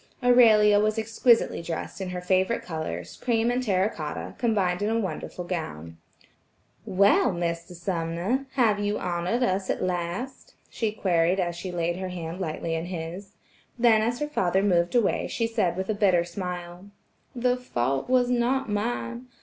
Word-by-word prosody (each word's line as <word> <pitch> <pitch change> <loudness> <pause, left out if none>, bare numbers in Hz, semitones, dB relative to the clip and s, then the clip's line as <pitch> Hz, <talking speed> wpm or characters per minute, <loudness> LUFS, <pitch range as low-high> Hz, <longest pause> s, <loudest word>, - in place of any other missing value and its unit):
Aurelia 220 -4 +6
was 215 +1 +1
exquisitely 225 0 +2
dressed 165 +3 -5
in 190 - -3
her 180 0 -4
favorite 185 +5 +1
colors, 90 - -5
cream 235 -1 +1
and 250 +1 0
terra 195 -5 +2
cotta, 155 -8 -5
combined 200 -6 +1
in 205 - +1
a 225 +1 +1
wonderful 180 -2 -4
gown. 85 - -5 0.9
"Well, 200 +2 +4
Mr. 170 0 -3
Sumner, 175 +8 -2
have 225 -6 +3
you 205 +1 0
honored 180 +8 -1
us 190 -3 0
at - - -1
last?" 185 - -4 0.2
she 225 -2 -1
queried 180 -3 +1
as 175 -2 -1
she 180 +1 -6
laid 175 0 -1
her 185 0 -4
hand 175 0 -6
lightly 165 -1 -3
in 165 +1 -2
his. 180 +3 -6 0.4
Then 230 -2 +5
as 235 +2 0
her 295 +2 -2
father 190 -9 +1
moved 175 0 +2
away 235 -4 +2
she 230 - -1
said 215 -7 0
with 190 0 -2
a 215 - 0
bitter 190 -4 +3
smile: 180 +1 -6 0.5
"The 250 0 +2
fault 135 - -2
was 250 -1 +4
not 250 +2 +1
mine. 235 +3 -3
190 Hz, 165 wpm, -26 LUFS, 175-225 Hz, 0.9 s, Aurelia